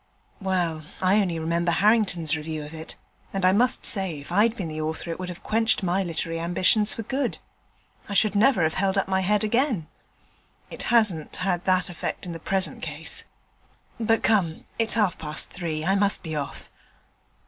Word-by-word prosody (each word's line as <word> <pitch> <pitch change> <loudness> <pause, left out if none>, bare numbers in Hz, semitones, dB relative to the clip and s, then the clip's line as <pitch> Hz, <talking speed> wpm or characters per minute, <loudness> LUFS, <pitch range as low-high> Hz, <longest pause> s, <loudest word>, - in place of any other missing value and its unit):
'Well, 175 -4 0 0.2
I 190 +3 +4
only 175 -4 -1
remember 170 +2 0
Harrington's 190 -5 +3
review 155 0 -5
of 150 - -10
it, 160 0 -7 0.4
and 195 -1 -1
I 185 - +6
must 245 +6 +2
say 190 -7 +1
if 140 +3 -10
I'd 215 +5 +3
been 185 - -3
the 155 0 -4
author 160 +2 -3
it 165 - -5
would 185 -1 -4
have 175 - -9
quenched 225 -1 +1
my 185 +2 +1
literary 165 -2 -2
ambition 180 +5 +2
for 225 +2 -4
good. 265 +2 -2 0.7
I 200 - -3
should 215 0 +4
never 210 -2 +4
have 160 0 +1
held 195 +1 0
up 195 - +1
my 190 0 +1
head 210 +3 +2
again.' 230 - +1 0.9
'It - - -7
hasn't 210 -10 +2
had 180 -2 -1
that 185 -1 +2
effect 175 0 -4
in 175 - -5
the 165 - -7
present 190 +3 0
case. - - -5 0.7
But 225 0 +1
come, 185 -8 +1
it's 225 0 +4
half 210 -6 +1
past 150 -1 0
three; 160 -4 -4
I 190 - +3
must 200 0 +2
be 160 -3 -4
off.' 140 -3 -6
185 Hz, 185 wpm, -25 LUFS, 165-210 Hz, 0.9 s, I